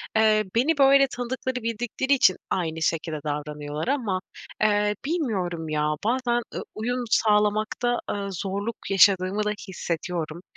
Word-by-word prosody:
eee, 215 -1 +4
beni 285 +7 +2
böyle 275 0 +6
tanıdıkları 255 +1 -4
bildikleri 240 +4 -1
için 220 -9 +4
aynı 160 -3 -2
şekilde 160 -1 -1
davranıyorlar 150 +2 -4
ama, 230 -9 0 0.4
eee, 210 0 +2
bilmiyorum, 190 - -2
ya, 150 0 +1
bazen, 240 0 +1
ııı, - - -3
uyum 245 +3 -2
sağlamakta, 215 +3 +2
ııı, 200 -1 -3
zorluk 200 +5 -3
yaşadığımı 195 +1 +4
da 210 - 0 0.2
hissediyorum. 170 -2 -4
210 Hz, 125 wpm, -25 LUFS, 175-240 Hz, 0.4 s, böyle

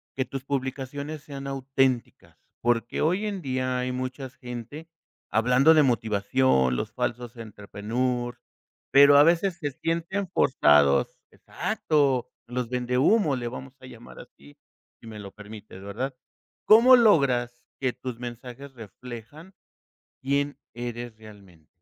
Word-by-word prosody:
que 130 - -1
tus 135 -1 -6
publicaciones 140 +2 -4
sean 140 -2 -8
auténticas?, 135 -2 -1 0.2
porque 120 0 0
hoy 180 +7 +1
en 200 -3 -3
día 130 -3 -2
hay 125 0 -2
muchas 130 +1 -5
gente 125 +5 -8 0.4
hablando 125 +7 +4
de 155 - +5
motivación, 105 - +2
los - - -3
falsos 120 0 -4
entrepreneurs, 115 +3 -3 0.5
pero 140 +1 +8
a 145 - +8
veces 170 +3 +2
se 145 -3 -3
sienten 170 +7 -3
forzados, 75 - +3
exacto, 135 -5 -1 0.2
los 125 -1 -3
vendehúmo, 130 - +2
le 120 -2 -4
vamos 130 +2 -9
a - - -12
llamar 120 -2 -13
así, 70 +1 -16 0.4
si - - -13
me 110 -1 -9
lo 100 -1 -9
permites, 105 -2 -12
¿verdad? 125 +7 -4 0.5
¿Cómo 235 +4 +8
logras 130 - +3 0.2
que 130 - +1
tus 125 -3 -7
mensajes 125 +3 -8
reflejan 125 - -11 0.7
quién 140 +1 0 0.2
eres 120 -1 -6
realmente? 100 -7 -16
125 Hz, 125 wpm, -26 LUFS, 115-140 Hz, 0.7 s, pero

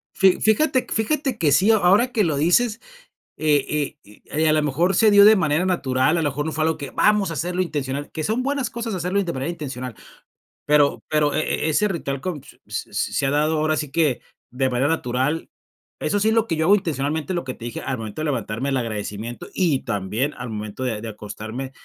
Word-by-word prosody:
Fí 190 -2 +4
fíjate 255 +4 +2
fíjate 260 +2 0
que 150 -7 +2
sí, 200 +8 +5
a 220 - +5
ahora 205 +7 +4
que 215 -3 +2
lo 155 -4 0
dices, 210 +9 +2 0.6
eh 150 -3 +2 0.4
eh 105 +1 -19
eh, 155 +1 +2
a - - +4
lo 155 -1 +2
mejor 165 +7 +1
se 215 +3 +5
dio 200 0 +8
de 215 0 +8
manera 155 -1 +1
natural, 140 -3 +1
a - - 0
lo 145 - +1
mejor 150 +3 -3
no 160 - -3
fue 155 0 0
algo 160 0 +1
que 140 - -6
vamos 210 -4 +2
a - - -4
hacerlo 180 +3 -1
intencional, 145 -4 -3
que 155 - -4
son 225 +4 0
buenas 275 -3 -1
cosas 230 -3 -4
hacerlo 180 +2 -1
in 190 - -3
de 170 - -2
manera 135 +5 -3
intencional, 130 -7 -6 0.7
pero 145 -1 +3
pero 150 -1 +2
e 155 +1 -1
e - - +2
ese 210 +7 +2
ritual 140 -7 -3
con, 175 -7 -4
p - - -20 0.2
s - - -5
s - - -2
se 140 - +1
ha 135 - +1
dado 155 +2 +1
ahora 155 0 +1
sí 145 -2 -3
que 150 -5 +1 0.3
de 130 +1 0
manera 125 +3 +1
natural. 140 +1 -1 0.5
Eso 205 - 0
sí 215 - +1
es 220 - +3
lo 225 -1 +3
que 165 -7 -2
yo 160 - +1
hago 200 +3 +6
intencionalmente, 155 -1 -2
lo 175 -6 -2
que 130 - -4
te 115 - -13
dije 120 - -5
al 130 - -3
momento 110 +5 -7
de - - -1
levantarme, 125 -2 -2
el 135 - 0
agradecimiento 110 0 -5
y 165 -8 +2
también 110 +6 -2
al 120 -1 -6
momento 105 +3 -5
de 115 -4 -2
de 115 - -6
acostarme, 110 +5 -7
155 Hz, 235 wpm, -22 LUFS, 130-185 Hz, 0.7 s, dio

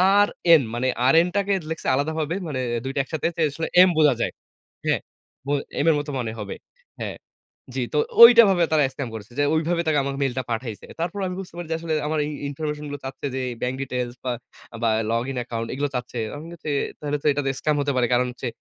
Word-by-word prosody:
R 175 -6 +5
মানে 125 +2 0 0.2
R 165 +5 +5
টাকে 200 0 +1 0.2
লিখছে 160 - -4
আলাদাভাবে 160 +3 -1
মানে 140 -4 -3 0.2
২ 135 - -3
টা - - +1
একসাথে 160 +3 -2
যে, - - 0
আসলে 160 +3 -3
এম 185 - +7
বোঝা 150 -4 +6
যায়। - - 0 0.5
হ্যাঁ, - - +1 0.4
বো 140 - -2 0.3
এম 145 - +1
এর 155 - +4
মতো 145 0 -5
মনে 115 -2 -2
হবে, 100 -2 -5 0.5
হ্যাঁ, - - -4 0.6
জি, - - 0
তো - - +1 0.3
ওইটা 235 0 +11
ভাবে 175 -3 +3
তারা 150 -2 +5
স্ক্যাম 130 -4 -4
করেছে। 110 +2 -9
যে, 145 - +4
ওই 160 - +3
ভাবে 170 -1 +2
তারা 150 -2 +3
আমাকে 140 0 -3
মেইলটা 130 -1 -1
পাঠাইছে। 115 -2 -4
তারপরও 180 +4 -2
আমি 180 - -4
বুঝতে 190 -3 -8
পারি 175 -2 -5
যে, - - +2
আসলে 165 -1 -3
আমার 155 0 0
এই 150 - -4 0.2
ইনফরমেশন 150 +1 -4
গুলো 145 0 -5
চাচ্ছে 135 - -6
যে, 130 - -1 0.2
ব্যাংক 125 +1 -1
ডিটেইলস 125 -2 -3
বা, 125 - 0 0.5
বা 115 - +4 0.2
লগ 115 +1 +1
ইন 130 - -5
অ্যাকাউন্ট 115 -1 -4
এগুলো 145 +2 -1
চাচ্ছে। 125 0 -4 0.2
আমি 150 +2 -8
বলছি 155 -3 -5 0.3
তাহলে 145 0 -2
তো - - +1
এটাতে 140 -1 0
স্ক্যাম 150 -1 +1
হতে 140 0 0
পারে। 120 -1 +3
কারণ 125 +1 +3
হচ্ছে 125 +1 -6
145 Hz, 220 wpm, -24 LUFS, 125-160 Hz, 0.6 s, ওইটা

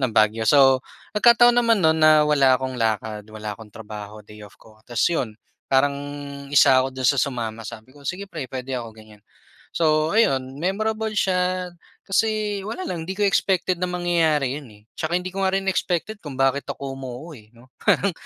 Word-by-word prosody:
Baguio. 110 +1 +3
So, 135 -3 +5 0.3
nagkataon 240 +2 +6
naman 230 -1 +3
no'n 160 - +5
na 155 -1 +6
wala 135 -4 +4
akong 130 -1 -4
lakad, 110 -1 -1
wala 110 -1 -6
akong 105 0 -13
trabaho, 105 0 -10
day 105 0 -13
off 105 -1 -14
ko 110 -1 -20
tapos 120 +1 -1
'yon, 115 -9 -3 0.3
parang 140 +1 +3 0.6
isa 135 -2 +5
ako 130 - -2
doon 130 -1 -4
sa 140 - +3
sumama. 115 -5 -3
Sabi 115 +4 -10
ko, 145 - -17
"Sige, 185 +7 -4
pre, 155 -9 -7
puwede 130 0 -5
ako," 120 -2 -4
ganyan. 110 -1 -16 0.5
So, 155 -1 +2
ayun 135 - +1
memorable 215 +4 -1
siya 180 -2 0 0.3
kasi 210 0 0
wala 370 +11 -5
lang, 170 - -5
di 190 - -4
ko 205 - +1
expected 185 -2 +1
na 180 - -1
mangyayari 165 -6 +1
yun, 135 - -14
eh. 105 -1 -18
Tsaka 165 +2 -2
hindi 180 0 -4
ko 195 - -4
nga 190 - +1
rin 195 - -2
expected 190 +6 -2
kung 145 -4 -8
bakit 135 +1 +1
ako 135 -1 -5
umuo, 135 +4 -8
eh, 110 -7 -14
'no. 125 +3 -20
Parang 200 -1 +2
140 Hz, 185 wpm, -23 LUFS, 120-180 Hz, 0.6 s, nagkataon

